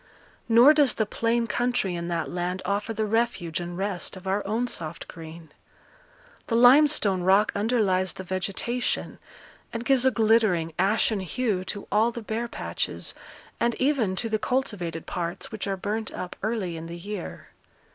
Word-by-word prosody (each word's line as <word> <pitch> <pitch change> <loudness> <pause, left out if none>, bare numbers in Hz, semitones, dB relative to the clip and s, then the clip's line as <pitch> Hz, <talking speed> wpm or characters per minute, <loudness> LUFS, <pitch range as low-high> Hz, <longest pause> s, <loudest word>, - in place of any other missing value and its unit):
Nor 240 +6 +8
does 290 -4 +3
the 220 - +1
plain 230 +2 0
country 240 -3 0
in 170 0 -4
that 170 -2 -1
land 180 +1 -3
offer 200 +3 -1
the 220 -1 -1
refuge 210 -7 0
and 175 0 -5
rest 195 -1 -3
of 185 - -12
our 195 +2 0
own 225 +4 0
soft 165 -7 -3
green. 160 -1 -11 1.0
The 230 - 0
limestone 245 -6 +5
rock 195 +4 +4
underlies 200 -4 +1
the 185 - -7
vegetation, 195 +7 -2 0.5
and 230 +1 -5
gives 265 -3 +4
a 260 - +6
glittering, 215 -9 +2
ashen 210 +2 +2
hue 195 0 -1
to 205 +1 -5
all 215 +3 +4
the 235 -1 -7
bare 225 +2 -2
patches, - - -3 0.5
and 235 0 +1
even 255 -8 +1
to 230 - -2
the 215 -1 0
cultivated 205 -10 -2
parts 170 +3 -4
which 215 -2 -4
are 195 -1 -1
burnt 215 +3 -3
up 180 - -6
early 210 -5 -2
in 160 +1 -7
the 170 +1 -7
year. 195 +1 -7
210 Hz, 165 wpm, -26 LUFS, 180-235 Hz, 1.0 s, Nor